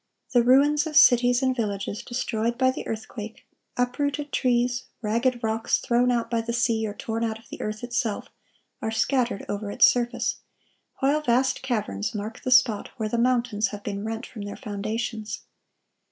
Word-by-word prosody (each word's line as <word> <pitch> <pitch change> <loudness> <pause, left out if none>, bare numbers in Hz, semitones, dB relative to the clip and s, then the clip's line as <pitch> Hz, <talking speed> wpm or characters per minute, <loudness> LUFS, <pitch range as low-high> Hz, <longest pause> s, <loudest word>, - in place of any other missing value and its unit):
The 245 - +6
ruins 285 +5 +4
of 305 - -6
cities 245 -3 +6
and 260 -1 +2
villages 205 -2 -3
destroyed 235 -1 -2
by 260 0 +4
the - - -6
earthquake, 220 0 -6 0.3
uprooted 285 +4 -1
trees, 245 0 +1 0.2
ragged 235 +3 0
rocks 225 0 +1
thrown 245 0 +2
out 240 -2 +1
by 230 -1 0
the 235 +1 -4
sea 230 -2 +1
or 205 - -6
torn 225 +1 -3
out 220 -1 -1
of 225 - -20
the - - -8
earth 215 +2 -4
itself, 240 -3 -2 0.5
are - - -1
scattered 235 -1 0
over 205 0 -3
its - - +6
surface, 240 0 +1 0.6
while 285 +3 +3
vast 260 -1 +1
caverns 230 -2 -2
mark 215 +3 -5
the - - -3
spot 250 -4 +4
where 220 -2 -2
the 235 - -1
mountains 235 -3 +2
have 205 +1 -8
been 200 -1 -4
rent 225 +2 -4
from 220 - -9
their 205 0 -6
foundations. 215 0 -4
235 Hz, 170 wpm, -25 LUFS, 220-250 Hz, 0.6 s, The